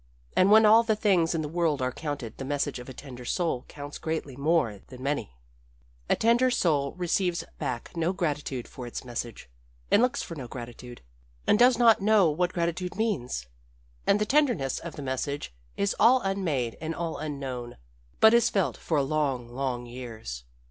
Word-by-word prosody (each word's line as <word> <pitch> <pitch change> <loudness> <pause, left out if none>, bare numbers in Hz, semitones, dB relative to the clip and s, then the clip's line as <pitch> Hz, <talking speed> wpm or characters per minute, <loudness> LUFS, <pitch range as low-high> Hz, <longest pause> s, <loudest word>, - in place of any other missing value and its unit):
And 185 - +5
when 220 +1 +7
all 220 +2 +8
the 220 -2 +1
things 185 -6 +2
in 160 - -1
the - - -3
world 160 -2 0
are 130 0 0
counted 145 -6 -5
the - - -4
message 140 -1 -2
of 125 - -9
a - - -6
tender 125 -2 -10
soul 160 -2 -1
counts 145 0 -8
greatly 160 -4 -3
more 140 -7 +1
than 130 -1 -11
many. 140 - -2 0.7
"A - - +4
tender 235 +3 +3
soul 155 - +1
receives 180 0 0 0.2
back 125 +6 -4
no 165 +1 +1
gratitude 150 -8 -2
for 125 -2 -8
its 120 - -6
message, 120 - -6 0.4
and - - +6
looks 250 +3 +1
for - - -7
no 135 -6 -7
gratitude, 120 0 -9 0.4
and 210 - +4
does 245 0 +6
not 230 -3 +5
know 200 -5 +4
what 175 +4 0
gratitude 175 +1 -2
means. 175 - -1 0.6
And 205 - +4
the 210 - +1
tenderness 245 - +2
of 170 - -8
the 145 - -6
message 135 - -3 0.2
is 200 0 0
all 245 +4 +6
unmade 165 - -1
and 160 0 -3
all 170 -1 -3
unknown, 135 -5 -5 0.4
but 220 +1 +7
is 235 0 +5
felt 195 -4 0
for 150 -4 0
long, 135 -4 -1
long 125 -1 -3
years. 115 - -7
150 Hz, 180 wpm, -27 LUFS, 130-195 Hz, 0.7 s, all